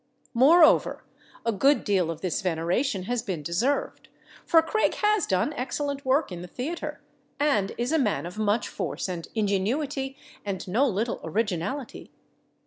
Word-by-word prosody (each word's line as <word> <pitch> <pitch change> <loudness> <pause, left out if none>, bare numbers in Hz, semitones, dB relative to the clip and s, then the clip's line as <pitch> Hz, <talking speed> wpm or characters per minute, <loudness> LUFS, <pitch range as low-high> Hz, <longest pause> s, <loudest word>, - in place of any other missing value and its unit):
Moreover, 310 +7 +5 0.4
a 230 - +2
good 275 +8 +3
deal 190 -5 +1
of 165 -1 -5
this 185 -3 -1
veneration 185 - 0
has 240 +4 -1
been 185 -9 -4
deserved, 225 - -1 0.4
for 325 -1 +6
Craig 435 +7 +1
has 420 -4 +2
done 190 +10 +1
excellent 280 +1 -3
work 270 -1 +1
in 175 -1 -6
the 180 - -7
theater, 285 - -5 0.4
and 275 -10 +2
is 240 +4 -1
a 320 - +3
man 210 -9 0
of 180 +5 -7
much 215 +1 +1
force - - -4
and 175 -3 -5
ingenuity 265 +7 -1 0.3
and 195 -2 -4
no 235 +10 +2
little 225 +1 -1
originality. 215 - -3
230 Hz, 150 wpm, -26 LUFS, 185-280 Hz, 0.4 s, for